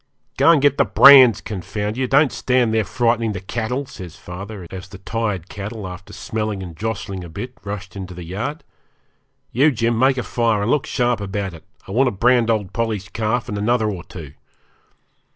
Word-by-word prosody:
'Go - - +4
and 165 -3 +6
get 145 -1 +3
the - - +7
brands 130 -5 +8
confound 105 +1 -4
you 130 +1 -1
don't 140 +2 +4
stand 125 -3 +1
there 110 -1 +2
frightening 115 -1 0
the 90 - -4
cattle,' 120 +7 -3
says 90 - -10
father, 95 +1 -8
as 95 -1 -8
the 95 - -10
tired 100 -3 -3
cattle, 105 0 -6
after 90 +2 -10
smelling 105 -1 -4
and 85 -3 -9
jostling 100 -2 -4
a 85 - -9
bit, 120 +10 -7
rushed 100 -2 -7
into 95 -2 -7
the 90 - -8
yard. 110 - -5 0.9
'You, 140 +6 +4
Jim, 115 -3 0
make 130 +1 +3
a 125 - -1
fire, 115 -4 0
and 115 - 0
look 150 - +1
sharp 120 -4 0
about 100 -1 -3
it. 80 - -12 0.2
I - - -8
want 130 +6 +3
to - - +1
brand 120 +3 +3
old 105 -5 -1
Polly's 110 -4 -2
calf 110 +4 -1
and 105 -4 -4
another 110 0 +1
or 90 -3 -6
two.' 75 -6 -10
110 Hz, 195 wpm, -20 LUFS, 95-120 Hz, 0.9 s, brands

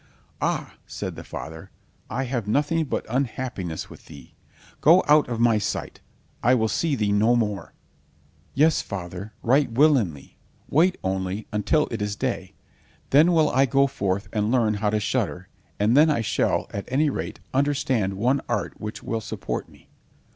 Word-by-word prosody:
"Ah," - - -1
said - - -5
the - - -8
father, 80 0 -8 0.4
"I 135 - -2
have 120 -5 -3
nothing 150 +7 +1
but - - -3
unhappiness 120 - -3
with - - -15
thee. 70 -5 -13 0.5
Go 170 +5 +6
out 150 -2 +5
of 115 -2 -3
my 115 -2 +4
sight. 100 - -4 0.4
I 125 +3 +4
will 110 -2 +2
see 160 +3 0
thee 105 -4 0
no 110 +4 +4
more." 105 -4 -2 0.8
"Yes, 155 +3 +4
father, 95 +1 -6
right 135 +2 +3
willingly, 115 - +2 0.3
wait 175 +6 +3
only 95 +2 -2
until 115 +9 +1
it 115 -2 -3
is 105 0 -2
day. - - -3 0.6
Then 155 +6 +6
will 160 -3 +3
I 135 +1 +3
go 135 +2 +4
forth 100 -6 -2
and 105 0 0
learn 115 -4 +3
how 105 0 0
to 105 +1 +1
shudder, - - -2 0.3
and 105 +4 +3
then 155 +3 +6
I 145 -6 +1
shall, 110 - 0
at 100 - -4
any 145 +3 +2
rate, - - -5
understand 130 -8 +1
one 125 +8 +1
art 120 -4 -2
which 105 0 -6
will 115 -1 -2
support - - -5
me." - - -20
115 Hz, 165 wpm, -24 LUFS, 105-140 Hz, 0.8 s, Go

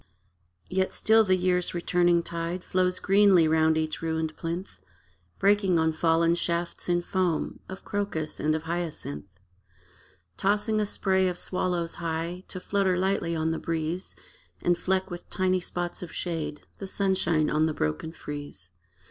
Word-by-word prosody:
Yet 190 +1 0
still 220 0 +5
the 185 -3 +3
year's 180 -1 +1
returning 175 0 +2
tide 170 +2 -4
Flows 185 0 +1
greenly 195 -4 +5
round 160 0 +3
each 155 -1 -1
ruined 160 -1 -2
plinth, 170 +3 -5 0.6
Breaking 200 -3 +3
on 160 0 +2
fallen 165 +1 +3
shafts 170 0 -1
in 175 0 +2
foam 180 -3 -1
Of 190 - -8
crocus 200 -7 -2
and 155 +1 +1
of 160 - -3
hyacinth: 165 - -4 1.1
Tossing 210 +2 +1
a 210 - 0
spray 190 -2 +1
of 180 -1 -2
swallows 175 -2 -1
high, 165 +2 -3
To 185 - -5
flutter 190 -1 +1
lightly 185 -3 0
on 160 0 0
the 165 - -2
breeze 165 +2 -3 0.4
And 175 - +2
fleck 190 +2 -1
with 175 - -8
tiny 185 0 +1
spots 175 0 -4
of 180 - -7
shade 160 -4 -4
The 195 - -6
sunshine 185 -6 +1
on 155 +1 +3
the 155 - -1
broken 75 - -2
frieze. 145 - -7
175 Hz, 150 wpm, -27 LUFS, 160-185 Hz, 1.1 s, still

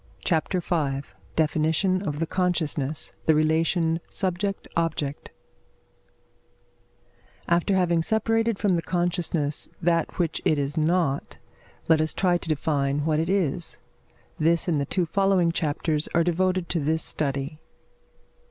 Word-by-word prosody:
CHAPTER 175 +2 +1
V 145 -6 -1 0.3
DEFINITION 160 +4 +1
OF 150 -7 -3
THE 165 - 0
CONSCIOUSNESS 160 -5 -1
THE 160 - +5
RELATION 160 +2 +2
SUBJECT 195 +1 -2
OBJECT 155 -4 -2 2.2
After 175 +3 +2
having 175 -3 +2
separated 225 +3 +1
from 200 -2 +1
the 170 - +1
consciousness 175 -4 -1
that 170 -1 0
which 170 -3 -1
it 155 - +2
is 140 +1 -2
not, 160 -3 0 0.5
let 160 -1 +4
us 155 - -1
try 180 -2 +2
to 165 - -9
define 145 -1 0
what 155 -1 +2
it 165 +2 -1
is. 180 -3 0 0.6
This 165 +3 +2
and 155 -5 +1
the 140 - -2
two 180 -2 0
following 190 -1 +2
chapters 155 -1 -1
are 170 - +4
devoted 180 +1 +1
to 170 - +1
this 160 +2 0
study. 140 +1 -2
165 Hz, 130 wpm, -25 LUFS, 155-180 Hz, 2.2 s, THE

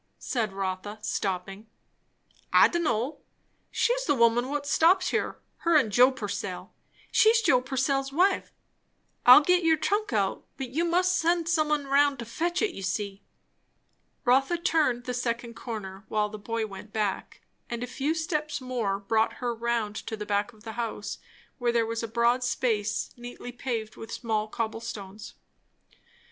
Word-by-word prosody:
said 225 -5 -2
Rotha 195 +2 -4
stopping. 195 +1 -3 0.8
"I - - +7
d'n' 345 - -1
know; 250 +2 -1 0.5
she's - - +1
the 290 - +2
woman 235 +1 +3
what 290 0 -2
stops 355 +6 +4
here; - - -1 0.2
her 335 -1 +1
and 225 -8 +2
Joe 245 +5 +6
Purcell. 270 +1 -5 0.4
She's 445 +1 +5
Joe 260 - +3
Purcell's 270 +1 -1
wife. 370 +7 +2 0.8
I'll 250 +4 +11
git 360 +3 +3
your 320 -1 +4
trunk 410 +4 0
out, 200 -4 0
but 260 -3 -5
you 325 +6 0
must 365 +2 +2
send 340 -1 +1
some 315 -3 +2
un 295 -2 +1
roun' 280 0 +3
to 235 - -6
fetch 345 - -1
it, 430 - +1
you - - -7
see." 200 +1 -3 1.0
Rotha 270 +7 +3
turned 300 -8 +1
the 250 - -4
second 240 -1 -2
corner, 200 -5 -7
while 210 -1 0
the 215 0 -8
boy 225 +1 -2
went 200 0 -10
back; 210 -3 -3 0.3
and 235 0 -3
a - - -1
few 275 +5 -2
steps 305 -3 -2
more 245 -7 -2
brought 220 +2 +1
her 245 -1 -3
round 230 -2 -1
to 220 - -4
the 210 - -5
back 205 +2 0
of 215 -2 -20
the 225 - -6
house, 220 -2 -5 0.4
where 240 -1 +1
there 235 -1 +2
was 230 0 -3
a 230 - -3
broad 235 +2 +2
space 230 -3 -1
neatly 245 0 -8
paved 235 -3 -4
with 225 0 -9
small 220 -3 -1
cobble 225 +1 -3
stones. 210 -2 -8
240 Hz, 165 wpm, -27 LUFS, 215-290 Hz, 1.0 s, I'll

